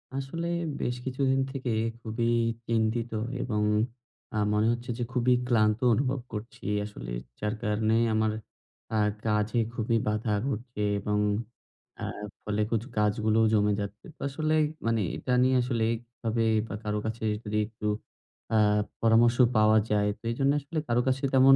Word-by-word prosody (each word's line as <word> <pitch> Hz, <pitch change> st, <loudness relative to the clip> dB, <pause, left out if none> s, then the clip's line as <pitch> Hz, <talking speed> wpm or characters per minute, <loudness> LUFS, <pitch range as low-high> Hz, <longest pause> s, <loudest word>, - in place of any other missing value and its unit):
আসলে 150 Hz, +5 st, -3 dB, 0.3 s
বেশ 120 Hz, -, 0 dB
কিছুদিন 135 Hz, 0 st, +1 dB
থেকে 130 Hz, -3 st, -3 dB, 0.3 s
খুবই 115 Hz, +1 st, -1 dB, 0.4 s
চিন্তিত 115 Hz, +1 st, 0 dB, 0.3 s
এবং 105 Hz, -4 st, 0 dB, 0.7 s
অ্যা -, -, -3 dB, 0.2 s
মনে 105 Hz, +1 st, +3 dB
হচ্ছে 120 Hz, +1 st, -4 dB
যে, 120 Hz, -, -1 dB
খুবই 125 Hz, 0 st, +3 dB
ক্লান্ত 110 Hz, -3 st, +3 dB
অনুভব 130 Hz, +3 st, +1 dB
করছি 105 Hz, +2 st, -7 dB, 0.2 s
আসলে। -, -, -8 dB, 0.3 s
যার 105 Hz, 0 st, -1 dB
কারণে 110 Hz, 0 st, +1 dB, 0.2 s
আমার 110 Hz, 0 st, +2 dB, 0.6 s
অ্যা 110 Hz, -, -1 dB, 0.3 s
কাজে 105 Hz, +2 st, +1 dB
খুবই 115 Hz, 0 st, +1 dB
বাধা 105 Hz, 0 st, 0 dB
ঘটছে 120 Hz, -3 st, -4 dB, 0.2 s
এবং 105 Hz, +1 st, 0 dB, 0.8 s
অ্যা -, -, -4 dB, 0.4 s
ফলে 105 Hz, 0 st, -1 dB
কিছু 115 Hz, -2 st, +1 dB
কাজগুলোও 110 Hz, +1 st, +3 dB
জমে 105 Hz, -1 st, +3 dB
যাচ্ছে। 100 Hz, 0 st, -7 dB
তো -, -, -22 dB
আসলে 155 Hz, +3 st, -1 dB, 0.3 s
মানে 115 Hz, -1 st, +2 dB
এটা 125 Hz, -, -2 dB
নিয়ে 130 Hz, 0 st, +3 dB
আসলে 120 Hz, -2 st, 0 dB
এইভাবে 115 Hz, -1 st, -3 dB, 0.2 s
বা 95 Hz, -, -5 dB
কারো 105 Hz, 0 st, -1 dB
কাছে 110 Hz, +1 st, -4 dB, 0.2 s
যদি 105 Hz, 0 st, -2 dB
একটু 110 Hz, -1 st, -9 dB, 0.6 s
অ্যা 110 Hz, -, +2 dB, 0.4 s
পরামর্শ 115 Hz, +1 st, +5 dB, 0.2 s
পাওয়া 110 Hz, 0 st, +5 dB
যায় 105 Hz, -1 st, +2 dB
তো -, -, -58 dB
এই -, -, -3 dB
জন্যে 140 Hz, +1 st, +4 dB
আসলে 145 Hz, +3 st, -7 dB
কারো 120 Hz, 0 st, +3 dB
কাছে 130 Hz, +1 st, +1 dB
তেমন 135 Hz, +1 st, +8 dB
115 Hz, 150 wpm, -28 LUFS, 105-125 Hz, 0.8 s, তেমন